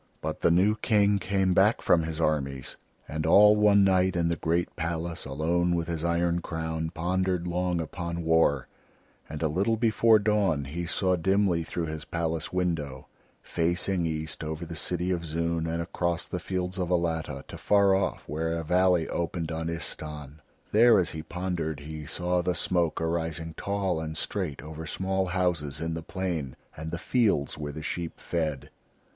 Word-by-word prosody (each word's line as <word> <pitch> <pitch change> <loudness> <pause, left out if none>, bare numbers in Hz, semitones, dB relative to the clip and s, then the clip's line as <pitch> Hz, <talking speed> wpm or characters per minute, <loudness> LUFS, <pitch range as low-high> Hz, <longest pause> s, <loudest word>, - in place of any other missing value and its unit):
But - - -4
the - - +4
new 95 +6 +3
King 105 -2 +3
came 95 -1 +1
back 100 +5 +4
from 85 - +3
his 80 0 -4
armies, 70 -5 -1 0.3
and 80 +1 -3
all 105 +6 +7
one 105 -1 +5
night 95 -1 +3
in 85 -1 +1
the 85 - +1
great 85 +2 -1
palace 85 +1 -3
alone 85 +5 +1
with 85 -1 -1
his 85 -2 -3
iron 85 0 +1
crown, 80 -1 -3
pondered 90 +1 -1
long 90 0 0
upon 85 +1 -4
war; 80 -5 +3 0.6
and 80 +1 -5
a - - +3
little 100 +9 +1
before 110 0 +5
dawn 100 -9 +1
he 85 +5 -4
saw 95 +1 +2
dimly 95 -1 +2
through 85 +1 -3
his 80 -1 -5
palace 80 -2 -2
window, 80 -7 -2 0.3
facing 85 +1 0
east 80 -2 -4
over 80 +2 -4
the 85 0 -7
city 90 +3 -1
of 85 -2 -1
Zoon 85 +1 -1
and 85 +1 -1
across 85 0 -2
the 90 - -3
fields 90 +1 -3
of 90 -2 -1
Alatta, 85 -3 -1
to - - -9
far 100 -1 +4
off 95 0 0
where 80 +2 -2
a 85 0 -2
valley 90 0 +3
opened 85 -1 -2
on 80 0 -3
Istahn. 75 -3 -6 0.3
There, 115 +1 +6
as 90 -3 +1
he 80 - -5
pondered, 85 -3 -3
he 75 0 -7
saw 90 +2 0
the 90 0 0
smoke 85 -3 0
arising 80 -1 -2
tall 100 -3 -1
and 80 -1 -5
straight 85 -6 -3
over 80 +1 -7
small 95 +2 -1
houses 90 -6 -1
in 80 0 -2
the 80 - -4
plain 85 -6 -3 0.2
and 80 +1 -6
the 85 - -3
fields 100 - +1
where 75 -1 -5
the 75 +1 -7
sheep 85 +1 -4
fed. 80 -5 -3
85 Hz, 175 wpm, -28 LUFS, 80-90 Hz, 0.6 s, all